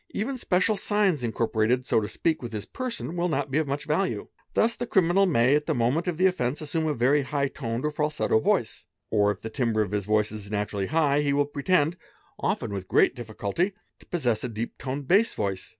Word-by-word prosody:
Even 255 +6 -1
special 210 -2 +1
signs 195 - +1
incorporated, 115 +1 0
so 110 - +2
to 105 - -3
speak, 160 +7 -1
with 120 -2 -6
his 105 -1 -4
person 240 -9 -4
will 175 +1 0
not 150 - -1
be 145 - +2
of 155 - -1
much 140 +1 -3
value. 185 +5 -1 0.3
Thus 230 +1 +3
the 245 - -4
criminal 190 0 +3
1 - - 0
nay, 125 -1 +4
at 150 0 +1
the - - +1
moment 125 +9 +1
of 175 -3 -1
the 185 - +3
offence, 145 -8 +1
assume 160 +1 -1
a 150 - 0
very 135 +5 +3
high 140 +1 -1
toned 115 -1 -4
or 150 - 0
falsetto 150 -6 +1
yoice; - - 0 0.3
or 105 -2 +3
if 105 - -3
the 110 - -6
timbre 115 -3 +1
of 100 - -6
his 105 -2 -1
voice 105 0 +2
is 105 -2 -8
naturally 105 -2 -2
high 150 -2 +2
he 145 -1 +1
will 145 0 +2
pretend, 145 +3 +1 0.4
often - - -1
with 95 -2 -5
great - - +3
difficulty, 120 - -2 0.3
to - - -20
possess 125 -11 0
a 125 - -2
deep 115 +1 -5
toned 135 +1 -4
bass 205 +7 +4
voice. 100 -2 -3
140 Hz, 225 wpm, -26 LUFS, 110-170 Hz, 0.4 s, nay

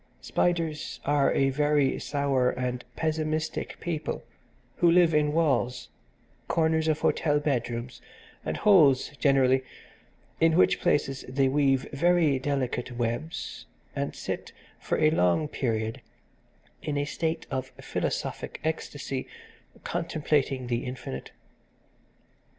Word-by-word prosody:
Spiders 165 -4 -1
are 145 -1 +3
a 135 0 +2
very 145 -1 +2
sour 140 -3 +1
and 125 -1 -3
pessimistic 155 0 -2
people 160 -3 -3 0.5
who 175 - +4
live 170 -1 +5
in 150 -1 +3
walls, 145 -6 +1 0.6
corners 160 -1 +2
of 155 -1 +1
hotel 145 -2 +2
bedrooms 120 -4 -2 0.4
and - - -3
holes 155 -11 +5
generally, 130 -2 +4 0.8
in 165 0 +4
which - - +4
places 135 -6 +1
they 135 +1 +2
weave 135 -1 +2
very 160 -2 +3
delicate 130 -3 -2
webs, 120 +7 -3 0.3
and - - -2
sit - - -5 0.3
for - - -1
a 155 - +4
long 90 - +2
period 110 -6 -2 0.8
in 145 -1 -2
a 145 - 0
state 160 +2 -2
of 130 -1 -2
philosophic - - -3
ecstasy, 145 -4 -3 0.6
contemplating 145 -5 0
the 120 0 -1
infinite. 125 - -6
145 Hz, 110 wpm, -27 LUFS, 130-160 Hz, 0.8 s, live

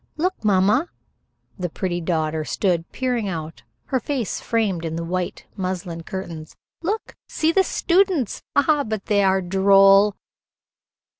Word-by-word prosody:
"Look, 365 0 -1
mamma." 210 - +3 0.7
The 180 -1 -2
pretty 175 +1 -3
daughter 160 -2 -1
stood 170 0 -1
peering 245 -5 -1
out, 160 -7 -6 0.2
her 260 - 0
face 250 -3 -3
framed 205 -7 0
in 160 -1 -3
the 165 - -3
white 180 +1 -3
muslin 180 -3 -4
curtains. 165 -3 -7 0.3
"Look. 415 +6 -3
See 320 +1 +1
the 385 +3 +4
students. 360 - +1
Ah, 290 0 +3
but 220 -4 -4
they 205 -1 +2
are 190 0 +2
droll!" 195 +2 +5
195 Hz, 135 wpm, -22 LUFS, 175-250 Hz, 0.7 s, droll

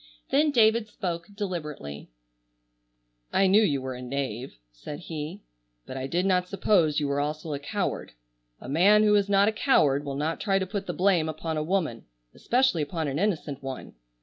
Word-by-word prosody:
Then 300 +3 +4
David 225 -4 +4
spoke 170 -5 -4
deliberately: 150 - -5 1.2
"I 195 - +3
knew 195 +3 +5
you 145 -10 +1
were 130 0 -4
a 125 - -8
knave," 130 -2 -4 0.2
said 105 - -8
he, 165 +4 -6 0.4
"but 130 - -8
I 130 0 -3
did 175 +6 0
not 180 -1 +2
suppose 180 -6 +2
you 145 - -1
were 140 0 0
also 150 +1 -3
a 140 - -3
coward. 185 - -3 0.5
A - - -10
man 195 +10 +5
who 210 -1 +4
is 200 -1 +3
not 200 0 +4
a - - +3
coward 145 - +3
will 140 -1 -4
not 155 +3 -2
try 195 -2 +2
to 190 - 0
put 200 +1 -5
the - - -2
blame 180 -4 +2
upon 160 +1 -4
a 155 - -1
woman, 155 -8 -1 0.3
especially 250 -9 +1
upon 155 +1 -2
an 140 +2 -2
innocent 160 -8 -1
one. 135 -1 -7
165 Hz, 185 wpm, -27 LUFS, 145-200 Hz, 1.2 s, knew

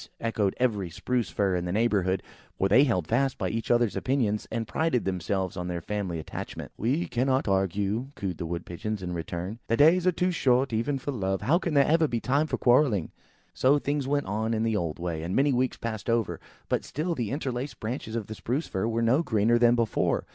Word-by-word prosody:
echoed 110 -4 0
every 105 -8 0
Spruce 120 +3 -1
fir 95 +3 0
in 90 0 -1
the 90 - -2
neighbourhood, 95 -4 +1 0.3
for 95 - +2
they 125 +9 +6
held 95 - 0
fast 125 - +1
by 95 -4 -1
each 115 +3 -3
other's 120 -3 +3
opinions, 120 -6 0
and 115 -1 -2
prided 160 -6 0
themselves 95 +1 -1
on 90 -1 -4
their 90 -1 -2
family 95 -2 -3
attachment. 80 - -7
"We 135 +10 0
cannot 130 +1 0
argue," 100 +5 0
cooed 95 -4 -4
the 85 - -3
Wood 85 +1 -4
pigeons 100 +3 -4
in 90 0 -3
return. 85 +5 -4
"The 115 - +1
days 170 +5 +5
are - - +6
too 180 +2 0
short, 130 -6 +2
even 115 +6 0
for 135 +2 -4
love; 95 -6 -2
how 165 +7 +3
can 170 -5 -2
there 140 -1 +6
ever 160 0 +3
be 120 -4 -1
time 140 +6 +1
for - - -1
quarrelling?" 120 - +3 0.4
So 135 +3 +4
things 145 -1 -1
went 145 0 0
on 110 +3 -1
in 110 - 0
the 115 -1 +1
old 85 -6 -2
way, 85 -2 -3
and 85 +3 -3
many 140 +1 +3
weeks 125 +1 0
passed 110 -1 -4
over; 115 -1 0 0.3
but - - 0
still 165 +4 -2
the 120 -9 -2
interlaced 135 -1 -3
branches 110 0 -4
of 115 -3 -2
the 110 - -7
Spruce 130 +8 -2
firs 95 +3 -2
were 115 0 0
no 125 +7 +4
greener 115 -4 +2
than 120 0 +5
before. 115 -3 0
115 Hz, 220 wpm, -27 LUFS, 95-130 Hz, 0.4 s, they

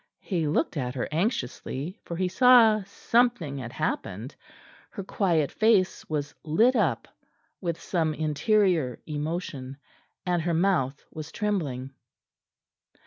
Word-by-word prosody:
He 170 -6 -1
looked 160 +2 0
at 125 -2 -2
her 125 - -2
anxiously, 165 - -2
for 170 - -5
he 185 +1 +1
saw 230 0 +6
something 215 - +1
had 120 -2 -6
happened. 110 +9 -3 0.6
Her 200 - -7
quiet 170 -7 +1
face 215 -4 +2
was 145 -2 -2
lit 220 +12 +3
up 165 - +1 0.5
with 170 -2 -2
some 160 -4 -1
interior 160 - +1
emotion, 150 -3 -4 0.5
and 175 -2 +1
her 170 0 0
mouth 160 -7 +1
was 155 0 -7
trembling. 145 -11 -2
165 Hz, 120 wpm, -27 LUFS, 145-200 Hz, 0.6 s, saw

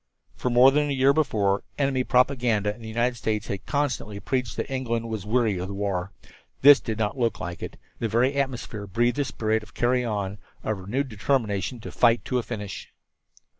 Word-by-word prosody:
For 125 - -2
more 125 +2 +7
than 145 +1 +1
a - - 0
year 135 +1 +4
before, 105 -10 +1 0.2
enemy 135 -2 +1
propaganda 125 -6 +2
in 115 - -16
the 110 - -8
United 120 +2 0
States 110 -2 -1
had 100 - -5
constantly 130 -8 -1
preached 125 -1 -2
that - - -2
England 115 -3 -2
was 105 -3 -4
weary 110 -4 +1
of 90 - -3
the 100 - -6
war. 100 -2 -2 0.5
This 145 0 +9
did 110 -2 -4
not 110 +4 -1
look 115 -2 0
like 85 -1 -6
it. - - -6 0.2
The 115 - 0
very 120 +5 +2
atmosphere 125 -6 -3
breathed 120 +7 +1
the 145 - +1
spirit 110 -2 -1
of 110 - -16
"carry 125 +1 +2
on," 105 -3 -3 0.2
of 110 -2 -2
renewed 125 +9 -2
determination 110 0 -1
to - - -7
fight 120 -1 +3
to 125 - 0
a - - 0
finish. 105 -4 -6
115 Hz, 200 wpm, -25 LUFS, 105-130 Hz, 0.5 s, This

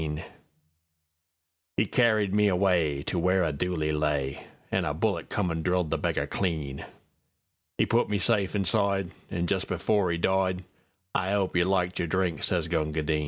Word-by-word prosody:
'E - - +3
carried 110 -5 +3
me 105 0 +4
awayTo 90 -5 +1
where 90 +1 +3
a 80 - 0
dooli 80 0 -1
lay, 75 -3 -1 0.2
An' - - +1
a - - -1
bullet - - -1
come 90 -4 0
an' 80 0 -2
drilled 90 -2 0
the 80 - +1
beggar - - 0
clean.'E 75 -7 -5
put 120 +1 +2
me 105 - +1
safe 100 0 +1
inside, 100 -1 +1 0.2
An' 85 0 -1
just 95 +1 -1
before 90 +1 +1
'e 85 - 0
died:"I 95 +1 -2
'ope 100 -3 0
you 90 -1 +4
liked 90 -1 0
your 85 - 0
drink," 90 -3 0
sez 85 -3 0
Gunga 80 -2 -1
Din. 75 0 +1
90 Hz, 155 wpm, -27 LUFS, 80-95 Hz, 0.2 s, me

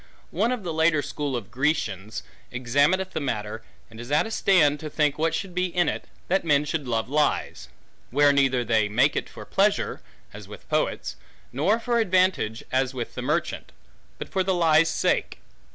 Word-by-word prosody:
One 235 - +1
of 245 -5 -3
the 170 -3 -3
later 160 -2 +2
school 145 -3 -3
of 120 - -3
the 95 - -24
Grecians, 125 - -2 0.3
examineth 145 +10 +1
the - - -3
matter, 110 -5 -3 0.3
and 110 0 -14
is 120 +3 -8
at 150 - +3
a 225 - -6
stand, 155 -9 +3
to 155 - -6
think 150 -1 0
what 165 +1 +1
should 195 0 -5
be 180 +1 0
in 175 -1 0
it, - - -3 0.2
that 190 +2 +1
men 150 -3 +2
should 150 -2 -3
love 115 -2 -1
lies; 150 +3 -1 0.4
where 145 +2 +4
neither 135 -3 +2
they 110 -2 +1
make 130 +7 +1
for - - -10
pleasure, 200 +1 +1 0.3
as - - -10
with - - -12
poets, - - -1 0.4
nor 220 +3 +2
for 235 0 0
advantage, 185 - +1
as 130 0 0
with 120 -2 -5
the 125 - -5
merchant; 150 +6 -2 0.5
but - - -7
for 190 - 0
the 190 0 0
lie's 165 -1 +4
sake. - - 0
150 Hz, 185 wpm, -25 LUFS, 125-180 Hz, 0.5 s, where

